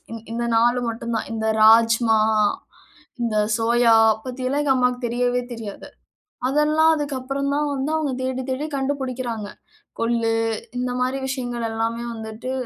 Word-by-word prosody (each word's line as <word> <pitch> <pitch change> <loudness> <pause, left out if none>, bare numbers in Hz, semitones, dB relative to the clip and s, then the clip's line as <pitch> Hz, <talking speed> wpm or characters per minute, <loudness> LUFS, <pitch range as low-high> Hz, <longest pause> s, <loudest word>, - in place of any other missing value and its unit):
இந் 230 0 -8
இந்த 235 +1 -2
4 240 +2 +3
மட்டும் 230 0 -4
தான். - - -3
இந்த 220 0 -2 0.2
ராஜ்மா, 225 0 +5 1.0
இந்த 225 -2 -1 0.2
சோயா 235 0 +3 0.3
பத்திலாம் 255 +2 -2
எங்க 280 -2 +3
அம்மாவுக்கு 250 0 0
தெரியவே 245 +1 0
தெரியாது. 220 -4 -8 0.6
அதெல்லாம் 305 +3 +3
அதுக்கு 290 -2 -3
அப்புறம் 275 +2 -2
தான் 295 0 0
வந்து 275 +3 -2
அவங்க 295 -4 -1
தேடி 260 0 -2
தேடி 265 +4 -2
கண்டுபுடிக்குறாங்க. 255 -5 -3 0.5
கொள்ளு 230 0 +1 0.5
இந்த 250 0 -1
மாதிரி 255 +2 0
விஷயங்கள் 245 -3 -3
எல்லாமே 230 +1 -2
வந்துட்டு 220 +3 -6
245 Hz, 135 wpm, -22 LUFS, 230-265 Hz, 1.0 s, ராஜ்மா